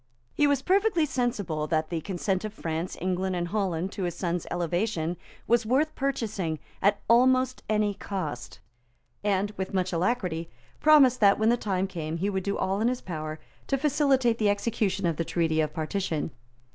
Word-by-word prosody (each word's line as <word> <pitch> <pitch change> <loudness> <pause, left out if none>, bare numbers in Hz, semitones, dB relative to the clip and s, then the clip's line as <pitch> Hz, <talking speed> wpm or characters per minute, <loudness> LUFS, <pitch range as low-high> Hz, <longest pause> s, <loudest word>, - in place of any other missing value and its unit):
He 295 - +3
was 280 -2 +1
perfectly 385 -3 +3
sensible 210 - -1
that 155 0 0
the 165 -2 -1
consent 190 +2 -2
of 215 0 -5
France, 165 0 -3
England 185 +1 -1
and 175 -1 -2
Holland 190 -3 -1
to 205 - -6
his 175 - -3
son's 175 -2 -2
elevation 175 0 -1 0.3
was 235 0 +3
worth 270 +8 +1
purchasing 215 - -2 0.2
at 200 +1 +3
almost 255 +2 +4
any 210 -1 +2
cost, 180 -10 -5 0.7
and, 205 0 +1
with 190 0 -3
much 185 -1 0
alacrity, 175 -3 -1 0.3
promised 280 -5 +6
that, 200 -2 +5
when 220 +1 +3
the 240 - +5
time 195 -5 -1
came, 165 -4 -4
he 195 +4 -1
would 190 -1 -1
do 200 +2 -2
all 195 +2 0
in 225 - +3
his 250 0 0
power 155 -3 -5 0.3
to 275 - +1
facilitate 270 -4 +2
the 210 -2 +3
execution 205 -2 0
of 165 -3 0
the 165 - 0
Treaty 160 -1 +1
of 155 -1 -1
Partition. 160 0 -2
195 Hz, 175 wpm, -27 LUFS, 170-235 Hz, 0.7 s, promised